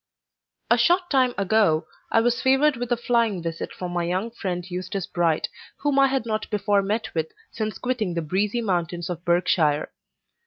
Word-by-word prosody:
A - - +5
short 350 +1 +3
time 260 -3 +3
ago, 200 -5 +2 0.3
I 225 - +4
was 240 +1 +1
favored 270 +3 +4
with 245 0 -5
a 240 - +3
flying 230 -4 +1
visit 165 0 -4
from 180 -1 -6
my 175 -1 -1
young 185 +7 -1
friend 180 -6 -4
Eustace 185 +1 -4
Bright, 165 -3 0 0.3
whom 285 -1 +1
I 275 - +6
had 265 -3 -1
not 215 -1 -2
before 205 -1 +2
met 210 +3 -2
with 160 -1 -2 0.2
since 215 -1 -3
quitting 230 -8 -2
the 170 - -1
breezy 200 +8 0
mountains 175 -2 -1
of 175 -1 -6
Berkshire. 175 -4 +2
200 Hz, 180 wpm, -24 LUFS, 175-235 Hz, 0.3 s, I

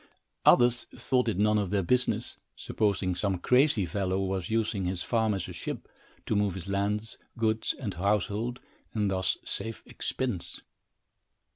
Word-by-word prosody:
Others 120 0 +6
thought 125 0 +1
it 110 - 0
none 105 +1 +3
of 100 -3 -1
their 100 0 +1
business, 125 +7 +1 0.2
supposing 100 -3 0
some 95 +1 +1
crazy 125 - +3
fellow 95 +2 -1
was 95 -2 -2
using 110 -3 0
his 90 -1 -2
farm 110 -3 +1
as 95 - -3
a - - -7
ship, - - -5 0.4
to - - 0
move 100 -2 +1
his 95 0 -7
lands, 105 +2 -1 0.2
goods 110 -1 +1
and 105 -7 -4
household, 105 +6 0 0.4
and 105 -2 +1
thus 95 -1 +1
save 115 -1 -5
expense. 120 -10 -3
105 Hz, 150 wpm, -29 LUFS, 95-115 Hz, 0.4 s, Others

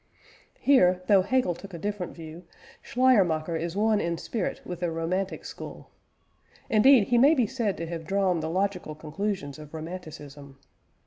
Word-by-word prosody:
Here, 180 -10 +4
though 195 -1 +5
Hegel 250 -1 +1
took 190 +2 -11
a - - -5
different 200 0 -4
view, 165 +1 -10 0.4
Schleiermacher 185 -11 +2
is 165 +3 -3
one 215 0 +2
in 170 0 -2
spirit 210 +3 -3
with 175 -1 -6
the 175 -1 -1
Romantic 175 +4 -3
school; - - -9 0.8
indeed, 225 0 +6
he 240 -1 +4
may 285 +6 +6
be 250 -5 +2
said 230 -4 -2
to 165 - -4
have 165 -1 -6
drawn 195 -3 +1
the 160 0 -3
logical 185 -3 -2
conclusions 155 -1 -4
of 150 +1 -11
Romanticism. 155 -4 -9
180 Hz, 155 wpm, -27 LUFS, 160-205 Hz, 0.8 s, indeed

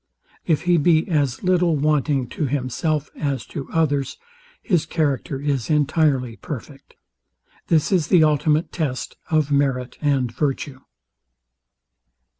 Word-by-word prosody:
If 160 -2 +1
he 175 0 +3
be 160 +1 +3
as 145 -4 0
little 180 -3 +2
wanting 145 -2 +1
to 150 - -2
himself 145 +3 -2
as 140 -3 -2
to 140 - -5
others, 145 -4 0 0.5
his 175 -8 +1
character 145 -4 -1
is 140 -5 -2
entirely 145 -5 +1
perfect. 140 0 -9 0.7
This 160 +1 +2
is 175 -6 +2
the 175 -4 +5
ultimate 155 +1 +2
test 145 -7 -3
of 155 -3 +1
merit 135 -3 0
and 135 -5 +1
virtue. 135 +1 -2
145 Hz, 120 wpm, -22 LUFS, 135-160 Hz, 0.7 s, the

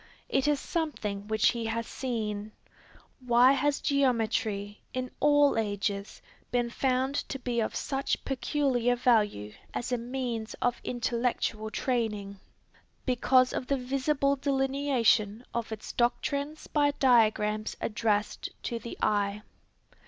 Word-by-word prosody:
It 270 +1 +1
is 295 -2 +2
something 215 - -3
which 215 -1 +3
he 235 -2 -2
has 230 +1 -2
seen. 215 -5 -4 0.7
Why 250 0 +5
has 280 +1 +1
geometry 220 -6 0
in 255 0 -3
all 290 -4 +4
ages 205 -1 -3 0.3
been 240 -1 0
found 260 +1 +1 0.2
to 270 - -3
be 245 -2 -2
of 220 - -1
such 270 0 -2
peculiar 260 -3 +1
value 210 - +2 0.2
as 245 - -3
a 245 - +1
means 240 -2 -4
of 245 -1 -1
intellectual 235 -2 -1
training? 210 -5 -2 0.7
Because 255 0 +3
of 250 - -3
the 275 - +1
visible 275 +2 +1
delineation 265 -5 +1
of 235 -1 -3
its 220 -1 -6
doctrines 280 +5 -1
by 290 -1 +2
diagrams 215 -4 +3
addressed 210 -1 -1
to 235 - -3
the 235 - -8
eye. 205 0 +1
240 Hz, 125 wpm, -29 LUFS, 215-270 Hz, 0.7 s, Why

